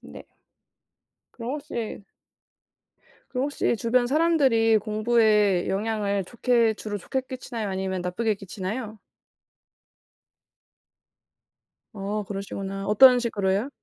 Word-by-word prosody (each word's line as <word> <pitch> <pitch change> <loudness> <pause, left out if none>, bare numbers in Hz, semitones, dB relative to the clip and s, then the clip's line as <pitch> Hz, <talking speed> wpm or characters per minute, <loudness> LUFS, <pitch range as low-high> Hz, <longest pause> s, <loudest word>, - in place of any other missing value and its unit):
네. - - -12 1.1
그럼 235 +1 -6
혹시 235 -8 -5 1.3
그럼 255 0 -2
혹시 285 -4 0
주변 240 +2 +1
사람들이 265 -7 +3
공부에 215 -3 +2
영향을 200 -1 -1
좋게 235 0 +1
주로 205 0 -5
좋게 265 +7 -3
끼치나요 245 -4 -5
아니면 190 -1 -2
나쁘게 205 +5 -1
끼치나요? 205 +3 -6 3.0
아 210 +1 -3
그러시구나. 195 0 -5
어떤 250 +4 +7
식으로요? 205 0 -1
215 Hz, 230 characters per minute, -25 LUFS, 200-240 Hz, 3.0 s, 어떤